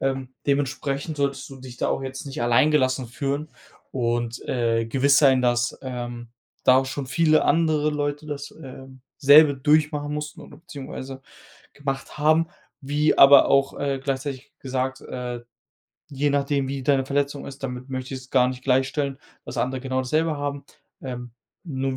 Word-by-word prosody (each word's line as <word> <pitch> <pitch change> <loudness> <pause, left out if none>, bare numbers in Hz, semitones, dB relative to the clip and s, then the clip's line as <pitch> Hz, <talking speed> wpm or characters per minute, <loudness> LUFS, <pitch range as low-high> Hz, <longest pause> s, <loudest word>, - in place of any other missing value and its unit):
Ähm, 135 -1 -2 0.2
dementsprechend 140 +2 -1
solltest 140 -1 -1
du 135 - -9
dich 125 -2 -10
da - - 0
auch - - -1
jetzt 135 +2 -6
nicht 135 -3 -4
allein 120 +6 +4
gelassen 130 -3 +1
fühlen 140 +5 -3 0.4
und, 120 -1 -1
äh, 115 -2 +1
gewiss 140 +5 +3
sein, 130 -3 +5
dass, 120 0 +1
ähm, 120 -2 -6 0.4
da 130 0 +7
auch 135 - 0
schon 130 0 -4
viele 155 +3 +3
andere 155 -1 +2
Leute 145 +1 -3
das, 145 -1 -6
äh, 135 -3 -11 0.3
selbe 145 +1 +7
durchmachen 150 +1 +1
mussten 150 0 -6
oder 145 - -13
beziehungsweise 135 -3 -8 0.5
gemacht 135 -1 -5
haben, 155 +2 +3 0.3
wie 145 +2 +1
aber 140 +1 +8
auch, 135 0 +2
äh, 140 -1 -1
gleichzeitig 135 -1 -4
gesagt, 130 0 -3
äh, 125 -1 -5 0.7
je 145 +1 0
nachdem, 140 -1 0
wie 135 -1 -4
deine 135 -1 +2
Verletzung 140 0 -1
ist, 140 0 -10
damit 125 0 -5
möchte 130 0 -5
ich 130 - -6
es 130 - -16
gar 125 -1 +4
nicht 130 0 -6
gleichstellen, 135 +1 0 0.3
dass 125 - -8
andere 130 +2 -1
genau 130 0 -2
dasselbe 155 +4 0
haben. 145 -1 -4 0.4
Ähm, 125 -2 -6 0.4
nur 135 -1 -2
135 Hz, 165 wpm, -24 LUFS, 130-145 Hz, 0.7 s, aber